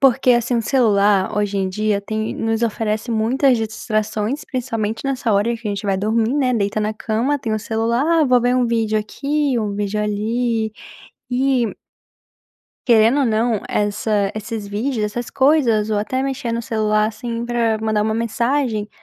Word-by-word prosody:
porque, 260 -1 +4
assim, 240 0 +1
o 230 - 0
celular 205 -6 +2
hoje 205 -1 0
em 190 -1 0
dia 210 +1 0
tem 215 +2 -3
nos 225 +1 -1
oferece 220 0 -1
muitas 245 +4 +2
distrações, 215 +4 -2
principalmente 225 -4 -3
nessa 260 -4 0
hora 205 +3 +2
em 235 - -1
que 225 -1 -9
a - - -1
gente 200 0 -4
vai 195 - +1
dormir, 220 +5 0
né. 260 -4 +1
Deita 205 0 0
na 210 +1 -1
cama, 235 +7 -1
tem 225 -4 -3
o - - -1
celular: 225 +4 0 0.2
"Ah, - - +4
vou 250 -2 +4
ver 245 +1 +2
um 250 -1 +2
vídeo 225 -2 +1
aqui 280 +5 -1
um 210 -2 -2
vídeo 205 +1 -2
ali." 220 +1 -1 0.6
E 250 -2 +1 1.1
querendo 230 +3 +5
ou 275 - +3
não, 225 -1 +1
essa 205 -1 0
esses 215 -1 -5
vídeos, 225 +5 -2
essas 235 +3 -4
coisas, 260 -7 +3
ou 215 - 0
até 235 +5 -2
mexer 270 -2 -2
no 230 0 -1
celular, 215 -2 +1
assim, 230 +2 -4
pra 230 -2 0
mandar 220 -1 0
uma 220 +1 0
mensagem, 230 0 -1
225 Hz, 175 wpm, -20 LUFS, 215-245 Hz, 1.1 s, querendo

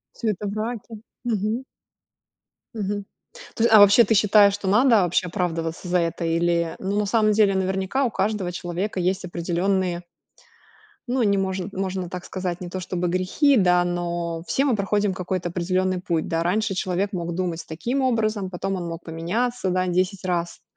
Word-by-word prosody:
Всё 225 - -2
это 210 0 -2
враки. 220 +2 -4 0.3
Мгм. 225 +2 -1 1.1
Мгм. 205 -1 -3 0.5
То 225 - -2
есть, - - +4
а 215 - +10
вообще, 205 +3 +8
ты 225 - +2
считаешь, 205 -1 +5
что 205 -1 -5
надо 220 +2 +5
вообще 180 +1 +1
оправдываться 165 -1 -3
за 180 0 +2
это? 170 0 -1
Или, 170 0 +1
ну, 200 +2 -2
на 210 - +1
самом 215 0 +3
деле, 205 -2 +4
наверняка, 190 +7 0
у 245 - +1
каждого 200 -2 -1
человека 180 +3 -4
есть 185 +1 0
определённые 175 +1 -1 1.1
Ну, 255 +1 0
не 200 -3 +3
можн 190 -1 -1
можно 190 -2 -3
так 180 -1 -7
сказать, 185 -1 -4
не 180 - -5
то 185 +1 -4
чтобы 180 0 -2
грехи, 185 - +2
да, 180 -2 +4
но 170 -1 -2
все 275 - +1
мы 255 - +2
проходим 205 0 0
какой-то 180 -1 -3
определённый 185 +1 0
путь, 170 -3 -1
да? 165 0 -1
Раньше 200 +4 0
человек 190 +2 -1
мог 170 -2 -3
думать 175 -2 -2
таким 240 +12 -2
образом, 215 -6 0
потом 195 +2 -3
он 175 -2 -4
мог 165 0 -6
поменяться, 190 +8 -2
да, 185 0 +1
10 185 +2 0
раз. 175 -2 -2
185 Hz, 175 wpm, -23 LUFS, 175-210 Hz, 1.1 s, а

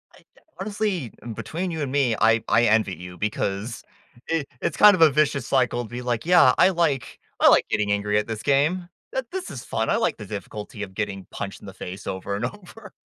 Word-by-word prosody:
I, - - -18 0.2
uh, - - -22 0.2
honestly, 200 - -2 0.2
between 160 - -4
you 160 -2 -4
and 135 - -2
me, 135 -5 +2
I 115 0 +4
I 115 - +4
envy 110 -4 +2
you, 90 +1 -10
because 105 +2 -3 0.5
i 160 -3 0 0.2
it's - - -2
kind 210 -1 +8
of 175 - -3
a 160 - +8
vicious 140 -2 +1
cycle 125 -2 +1
to 110 - -10
be 120 +2 -6
like, 120 0 -2
"Yeah. 175 -7 +6
I - - +6
like 165 -7 -1 0.2
I - - +7
like - - +5
getting 105 -1 0
angry 105 0 +1
at 105 - 0
this 110 -1 -5
game. 155 +6 +1 0.2
Th 265 -1 -2
this 375 -1 -4
is 125 - -7
fun. 110 0 -2
I - - +3
like - - 0
the 105 - -8
difficulty 105 +2 -7
of 95 -2 -8
getting 100 -2 -4
punched - - -6
in - - -11
the - - -9
face 95 +3 -8
over 95 +1 -3
and 105 +4 -2
over." 210 - -10
120 Hz, 225 wpm, -24 LUFS, 105-165 Hz, 0.5 s, kind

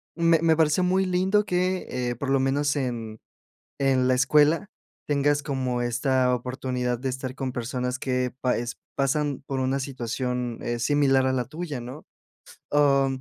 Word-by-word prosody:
me 165 -1 +4
me 165 -1 +4
pareció 160 +3 +3
muy 190 +1 +2
lindo 190 +3 +2
que, 185 0 0
eh, 125 -1 -2
por 135 +3 -4
lo 135 - +3
menos 145 +2 +1
en 115 -5 -3 0.6
en 130 -2 +2
la - - +4
escuela 150 +8 +3 0.4
tengas 145 0 +2
como 130 -3 -2
esta 125 +1 +1
oportunidad 125 0 -2
de 135 0 -2
estar 130 0 -4
con 130 -2 -3
personas 125 +1 -3
que 125 -1 -1
pa 125 - +1
es, 120 +1 -4 0.2
pasan 140 0 0
por 135 -1 -2
una 130 +1 0
situación, 125 -2 -3
eh, 120 0 -2
similar 135 0 +3
a - - +2
la 125 -2 0
tuya, 155 -1 -5
¿no? 130 +6 -9 0.7
O, 140 -2 +4
135 Hz, 165 wpm, -25 LUFS, 125-145 Hz, 0.7 s, me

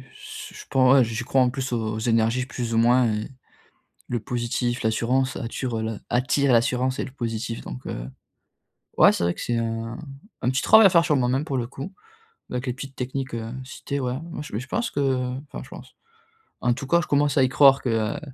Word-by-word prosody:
su - - -10
je - - -10
pen 135 - +2
ouais, 135 -2 +6
j'y 115 +1 -4
crois, 135 +2 +2
en 125 - +4
plus, 135 0 -4
aux 110 -2 -1
aux - - -4
énergies, 115 +2 +1
plus 120 -3 -4
ou - - +3
moins 120 +1 +4
et 105 0 -3 0.8
le 120 - -1
positif, 120 +1 -2
l'assurance 125 +4 +1
attirent 115 0 -3
la 110 -1 -3
attirent 135 +2 +2
l'assurance 125 +2 +2
et - - -1
le - - -9
positif, 115 -3 -4
donc 60 - -8
heu. - - -5 0.9
Ouais - - +7
c'est - - -3
vrai 85 0 +1
que - - -9
c'est 120 - -1
un 115 0 -3 0.5
un 125 - +2
petit 130 - 0
travail 220 -1 +8
à - - +6
faire 170 -2 +5
sur 160 -3 +2
moi-même 130 +2 +1
pour 140 -4 -2
le 120 -2 -2
coup, 140 +8 -8 0.6
avec 125 +1 -3
les - - 0
petites 135 +1 -8
techniques, 130 0 -4
heu, 115 0 -5
citées, 140 +2 -5
ouais 125 -2 -1 0.2
moi 165 - -6
mais 105 - -2
je 130 - -10
pense 235 - -1
que - - -1 0.5
enfin, - - -6
je - - -15
pense, - - -12 0.6
en 125 - +2
tout 130 +3 -4
cas 170 +5 +3
je - - -6
commence 145 0 +2
à 135 - +5
y 130 - +4
croire 135 0 +5
que, 130 - -2
heu, 110 -2 0
125 Hz, 225 wpm, -24 LUFS, 115-135 Hz, 0.9 s, travail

